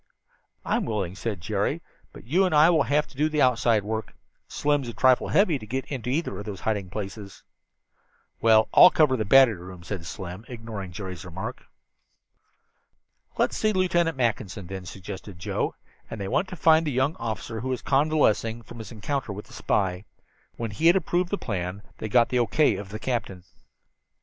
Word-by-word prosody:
"I'm - - 0
willing," 100 -5 -2
said 100 -2 -4
Jerry, - - -1 0.3
"but - - -13
you 170 +11 +2
and 180 -4 +1
I 155 +3 +7
will 160 -3 +3
have 150 +1 +3
to - - -18
do 150 +3 +1
the 155 -1 +2
outside 115 -4 +3
work. 110 +1 -4 0.3
Slim's 145 -3 0
a - - -6
trifle 130 -1 +4
heavy 180 -8 +3
to 110 - -9
get 130 +3 -3
into 125 -4 -4
either 160 +6 -1
one - - -6
of 105 - -8
those 100 -3 -6
hiding 105 -4 -2
places." 100 0 -7 1.0
"Well, 110 -1 +5
I'll 180 - +10
cover 150 -7 +3
the 110 -4 -2
battery 130 +2 +7
room," 90 -1 -10
said 85 -2 -6
Slim, 90 +4 -7
ignoring 110 -6 -7
Jerry's 90 -2 -7
remark. 95 +8 -7 1.7
"Let's - - +1
see 215 0 +1
Lieutenant 175 -5 +1
Mackinson, 110 -5 -1
then," 95 0 -7
suggested 95 +1 -8
Joe, 90 - -2 0.3
and 115 - -6
they 100 - -3
went 165 - 0
to 185 - -7
find 160 -1 +4
the - - 0
young 130 +4 +1
officer 115 0 -4
who 130 - -4
was 130 -2 -3
convalescing 135 -6 +2
from 120 - -11
his 110 -3 -8
encounter 120 +2 -3
with 105 +1 -7
the 120 - -17
spy. 95 -3 -1 0.5
When 115 -2 -4
he 155 +11 +1
had 170 - +7
approved 175 0 0
the 205 - -1
plan 95 - -4 0.2
they 110 - -4
got 120 +2 +4
the 125 - +1
O. 120 - +2
K. 155 -1 +3
of 100 -1 -7
the 105 - -5
captain. 110 -6 -3
115 Hz, 190 wpm, -26 LUFS, 100-145 Hz, 1.7 s, I'll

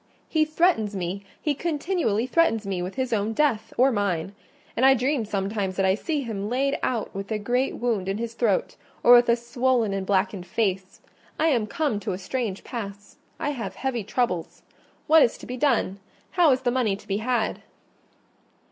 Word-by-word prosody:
He 310 -1 +2
threatens 310 - +1
me—he 195 - -3
continually 300 - -1
threatens 255 -6 +2
me 190 -2 -2
with 180 +2 -5
his 260 -2 -1
own 215 +1 0
death, 225 -5 +1
or 265 +2 +5
mine: 195 -4 -1 0.4
and 245 - 0
I 265 0 +7
dream 260 -1 0
sometimes 195 -1 -2
that 195 - +1
I 190 - +4
see 295 - -2
him 210 -5 -4
laid 275 +3 0
out 230 -4 -2
with 195 +2 -6
a 215 - +1
great 245 +5 0
wound 220 -6 -1
in 195 - -1
his 230 0 -4
throat, 230 -5 0 0.3
or 245 - +8
with 240 0 +7
a 235 - +6
swollen 240 -2 0
and 195 -1 -2
blackened 190 -1 0
face. 190 -2 -2 0.4
I 320 - +3
am 235 -7 +1
come 280 -3 -1
to 205 -2 -3
a - - -3
strange 200 +1 -3
pass: 205 -4 -7 0.2
I 290 - -1
have 245 -5 -5
heavy 255 -5 -2
troubles. 190 -6 -2 0.4
What 320 0 +6
is 235 - +3
to - - -11
be 250 - -5
done? 240 -7 +1 0.3
How 345 -5 +4
is 255 - +2
the 245 - +1
money 240 -6 +1
to - - -15
be 195 - 0
had?" 230 0 -1
225 Hz, 190 wpm, -25 LUFS, 200-260 Hz, 0.4 s, or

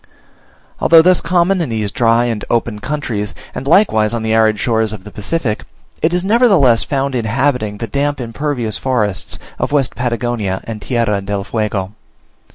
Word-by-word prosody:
Although 165 0 +6
thus 180 0 +4
common 180 +2 +2
in 160 - -2
these 110 -3 -2
dry 115 +1 +2
and 115 -3 -2
open 115 -2 0
countries, 120 -6 -3 0.2
and 135 - -6
likewise 115 - +3
on 115 - -3
the 110 0 0
arid 110 -1 +3
shores 110 -2 +1
of 100 -3 -8
the 105 - -11
Pacific, 110 +1 -2 0.4
it 160 - +2
is 180 0 0
nevertheless 195 - +4
found 140 -1 -1
inhabiting 120 -2 0
the 115 - -4
damp 140 +3 -1
impervious 120 -2 -3
forests 110 -7 -1 0.2
of - - -1
West 140 -3 +1
Patagonia 120 -5 -2
and 110 -2 -7
Tierra 115 -5 0
del 100 0 -3
Fuego. 105 -3 -2
120 Hz, 165 wpm, -16 LUFS, 105-145 Hz, 0.4 s, Although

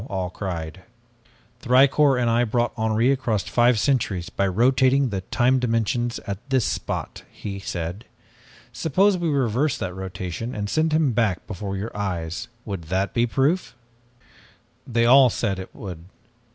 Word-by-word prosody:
all 95 -2 -3
cried. 90 -3 -5 0.8
"'Thicourt 135 +2 +4
and 120 - +1
I 115 +1 +3
brought 120 +1 0
Henri 110 +3 +2
across 115 -7 0
five 120 +2 +3
centuries 105 -9 0
by 100 - 0
rotating 130 +6 +3
the 95 -3 -3
time 125 +7 +2
dimensions 120 0 0
at 100 -1 -4
this 130 -5 +2
spot,' - - -4
he 100 -1 -6
said. 90 +2 -5 0.7
'Suppose 185 +5 +2
we 170 -1 0
reverse 135 0 +1
that 90 - -4
rotation 95 +4 -5
and 105 -1 -3
send 160 0 +1
him 155 -3 +2
back 105 -6 0
before 95 +1 -5
your 105 +4 -5
eyes 90 -4 -3 0.2
would 95 -6 -5
that 95 +4 -1
be 120 0 +2
proof?' 140 +9 0 1.1
"They 115 -1 +1
all 130 +1 +7
said 105 -4 -1
that 95 - -5
it - - -29
would. 90 -5 -8
115 Hz, 150 wpm, -23 LUFS, 95-130 Hz, 1.1 s, all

